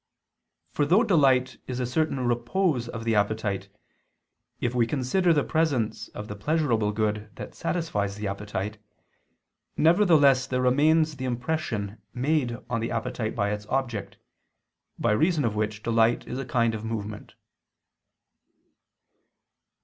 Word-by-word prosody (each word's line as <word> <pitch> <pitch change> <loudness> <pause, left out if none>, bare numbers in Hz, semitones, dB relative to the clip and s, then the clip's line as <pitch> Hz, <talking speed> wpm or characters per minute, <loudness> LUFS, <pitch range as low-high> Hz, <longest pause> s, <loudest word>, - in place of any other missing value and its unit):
For 150 - 0
though 180 +10 +4
delight 135 - +3
is 125 -1 -4
a 125 - 0
certain 140 +2 0
repose 120 +3 0
of 115 -1 -6
the 115 0 +1
appetite, 105 -2 0 0.9
if 120 0 -1
we 120 -2 +2
consider 150 +8 +1
the 150 -3 +3
presence 145 -9 0
of 105 - -8
the 105 - -6
pleasurable 115 -3 +1
good 105 0 -1
that - - -8
satisfies 105 - -2
the 105 0 -4
appetite, 105 +1 -4 1.0
nevertheless 155 -7 +5
there 125 -1 -1
remains 155 +4 +3
the 130 - -4
impression 120 -5 -3
made 130 -2 0
on 115 -2 -1
the 115 - -2
appetite 115 -1 -3
by 100 -2 0
its 105 0 -5
object, 120 -4 -2 0.8
by - - +1
reason 155 +5 +2
of 110 - 0
which 105 0 -2
delight 115 0 +2
is 125 - -4
a 135 - -4
kind 120 -2 +1
of 110 -1 -5
movement. 110 -2 -5
120 Hz, 135 wpm, -26 LUFS, 110-145 Hz, 1.0 s, nevertheless